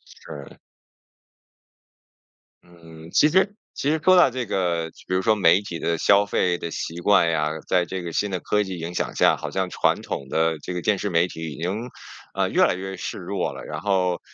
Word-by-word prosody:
是。 70 -1 -11 2.1
嗯， 80 -2 -14
其 150 - +5
实 190 +5 +2 0.2
其 140 - 0
实 160 - +1
说 185 - +6
到 175 -6 +6
这 125 -1 -3
个， 85 -5 -1 0.2
比 - - -2
如 95 - +2
说 110 +3 +3
媒 95 -1 +4
体 85 -4 -6
的 85 0 -1
消 100 +5 +4
费 90 -3 0
的 85 - -6
习 85 +1 -5
惯 85 -2 +4
呀， 75 -2 0 0.2
在 90 -1 +2
这 95 +2 -5
个 85 -1 -6
新 100 +4 -1
的 90 - -2
科 105 +3 0
技 95 -3 -6
影 85 +2 -5
响 - - -2
下， - - +4
好 - - -6
像 95 -1 -1
传 - - +1
统 70 - -5
的 80 +1 +1
这 90 - -6
个 90 - -3
电 105 - +1
视 105 - -3
媒 85 -1 +2
体 80 -2 -7
已 80 - -10
经， 105 +8 -3 0.4
呃， - - 0
越 - - +3
来 - - +2
越 95 +1 -6
势 - - -5
弱 - - -3
了， - - -9
然 - - -6
后 90 -3 +1
90 Hz, 225 characters per minute, -23 LUFS, 85-100 Hz, 2.1 s, 说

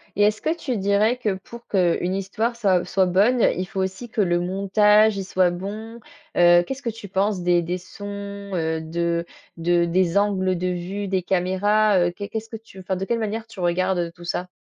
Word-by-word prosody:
Et 205 - +3
est-ce 210 +1 +2
que 315 - 0
tu 260 -8 -3
dirais 200 +4 +2
que, 220 -5 -1
pour 235 +5 -12
qu'une 180 -1 +1
histoire 220 +5 -2
soit 195 -6 +2
soit 190 -1 +2
bonne, 205 +7 +3 0.2
il 185 - -1
faut 190 +1 -3
aussi 190 +6 -4
que 220 - 0
le 175 -3 +2
montage, 205 +3 +3
il 195 - -2
soit 185 -1 +2
bon? 215 +6 -6 0.4
Heu, 175 0 +6
qu'est-ce 270 +9 -6
que 240 - -2
tu 220 -2 -8
penses 195 0 0
des 175 0 +3
des 175 +2 -3
sons, 200 +1 -8
heu, 160 -1 -1
de 170 +1 -1 0.3
de 170 +1 +2
des 175 +1 +1
angles 190 -3 +1
de 180 +1 -2
vue, 180 +3 -3
des 190 -1 0
caméras, 195 +3 +2
heu? - - -2
Qu'est 200 +3 -7
qu'est 220 - -2
ce 225 +1 -15
que 225 - -6
tu 215 -3 -15
enfin, 190 0 -3
de 190 +1 -3
quelle 230 +4 -1
manière 220 +1 -3
tu 225 - -13
regardes 175 0 0
tout 175 - -14
ça? 180 +1 -3
190 Hz, 215 wpm, -23 LUFS, 180-210 Hz, 0.4 s, Heu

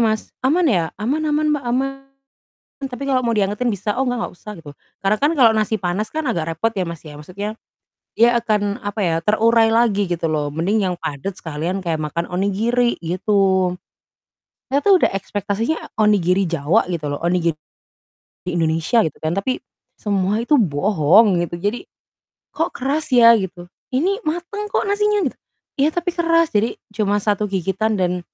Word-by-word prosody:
Mas? 220 -2 0
Aman 315 +7 +2
ya?" 180 - +2
"Aman 260 +9 -1
aman, 300 0 +1
Mbak, 285 -3 -2
aman, 265 +3 +1 1.0
tapi 255 +2 -6
kalau 265 -2 +1
mau 240 - -1
diangetin 210 +4 0
bisa." 205 0 -2
"Oh, 265 - 0
enggak, 245 -1 -1
enggak - - -10
usah." 210 +4 -10
Gitu. 160 -3 -11 0.3
Karena 195 +2 +2
kan 290 - +3
kalau 235 -4 +6
nasi 220 0 0
panas 190 +3 -2
kan 315 0 -3
agak 165 - -2
repot 225 +6 0
ya, 195 - -2
Mas, 170 -2 -6
ya, 150 - -9
maksudnya 185 +8 -6 0.6
dia 240 +1 +4
akan, 210 -3 -1
apa 205 +1 -5
ya, 170 -3 +1
terurai 225 +3 +4
lagi 220 -4 +2
gitu 170 -1 -1
loh, 150 -2 0
mending 190 +7 0
yang 180 - -2
padat 160 +5 -4
sekalian 170 +4 -4
kayak 165 -3 -1
makan 155 +3 -3
onigiri, 220 +6 +1
gitu. 190 +1 +1 1.0
Saya 280 - +3
tuh 400 +3 +5
udah - - +3
ekspektasinya 205 +7 -2 0.2
onigiri 195 -3 +3
Jawa 170 +6 +1
gitu 160 -5 -3
loh, 145 - -3
onigiri 170 -2 +1 0.9
Indonesia 165 +6 +1
gitu 155 - -4
kan, 155 - 0
tapi 255 +6 -1 0.3
semua 200 +1 0
itu 295 +5 +3
bohong 185 +3 +3
gitu. 170 - -7
Jadi, 205 +7 -3 0.7
"Kok 325 +2 0
keras 280 +4 -1
ya?" 235 -2 +8
Gitu, 175 -2 -6 0.2
"Ini 370 - 0
mateng 350 +6 -3
kok - - 0
nasinya." 415 -1 +1
Gitu, - - -25 0.4
"Iya, 290 - +4
tapi 350 +1 -1
keras." 335 -1 +2
Jadi 220 +2 +1 0.2
cuma 205 -1 +1
satu 210 0 0
gigitan 195 +3 -1
dan 180 -1 0
205 Hz, 170 wpm, -20 LUFS, 180-245 Hz, 1.0 s, ya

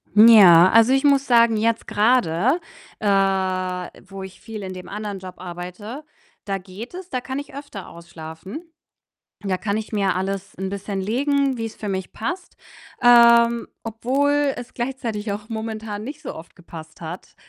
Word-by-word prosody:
Ja, 195 -6 +9
also 230 +3 +6
ich 270 +2 +2
muss 280 -1 +4
sagen, 235 -2 +5
jetzt 230 +1 0
grade, 225 - +2 0.4
äh, 210 - -1 1.0
wo 195 -1 -8
ich 190 -1 -12
viel 220 -1 -8
in 185 - -5
dem 185 -1 -9
anderen 205 -1 -5
Job 185 -1 -9
arbeite, 180 - -8 0.4
da 195 -1 -2
geht 195 - -10
es, 370 0 -9
da 255 - -2
kann 260 +2 -5
ich 285 - -8
öfter 280 -9 -8
ausschlafen. 170 - -10 0.8
Da 190 -2 0
kann 200 +1 -2
ich 220 0 -4
mir 200 -4 +1
alles 195 +1 -3
'n 190 0 -3
bisschen 200 0 -4
legen, 275 +5 +1
wie's 225 -1 -5
für 210 - -5
mich 190 -1 -4
passt, 350 - -5 0.5
ähm, 235 -1 +6 0.2
obwohl 275 +5 +1
es 245 - -9
gleichzeitig 235 -5 -3
auch 210 +2 -8
momentan 220 -2 -5
nicht 295 +4 -8
so - - -6
oft 160 - -12
gepasst 160 -2 -12
hat 170 +3 -8
215 Hz, 160 wpm, -22 LUFS, 190-245 Hz, 1.0 s, Ja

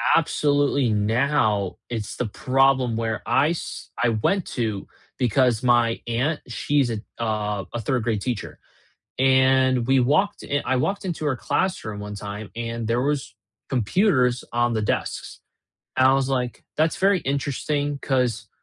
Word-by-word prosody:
absolutely 145 -4 +2
now 110 -1 +1
it's 110 -3 -4
the 125 - -2
problem 130 0 +2
where 115 -2 -2
I 150 - +3
s 170 - -5
I 125 - +3
went 165 - +1
to 110 -5 -2 0.3
because 125 -1 +2
my 120 -2 +3
aunt, 130 +7 0
she's 135 +1 0
a 110 -2 -2 0.2
uh, 105 -2 -1
a 120 - -3
3rd 120 +1 0
grade 110 -4 -1
teacher, 125 -4 -4 0.6
and 130 -1 +4
we 135 0 +4
walked 150 +11 +2
in 145 0 -1
I 130 - +1
walked 195 +8 -1
into 170 -3 -3
her 140 -3 +1
classroom 120 - -2
one 105 0 -6
time 100 +1 -7
and 115 -1 -4
there 120 +2 +1
was 140 -9 -2 0.3
computers 125 - +2
on 120 0 +1
the 110 - 0
desks; 105 - -3 0.6
I 130 +1 +6
was, 135 -1 +1
like 125 -2 -2
that's 160 +1 +2
very 195 -2 +3
interesting 145 +1 -2
'cause 125 -5 -1
125 Hz, 150 wpm, -23 LUFS, 115-140 Hz, 0.6 s, I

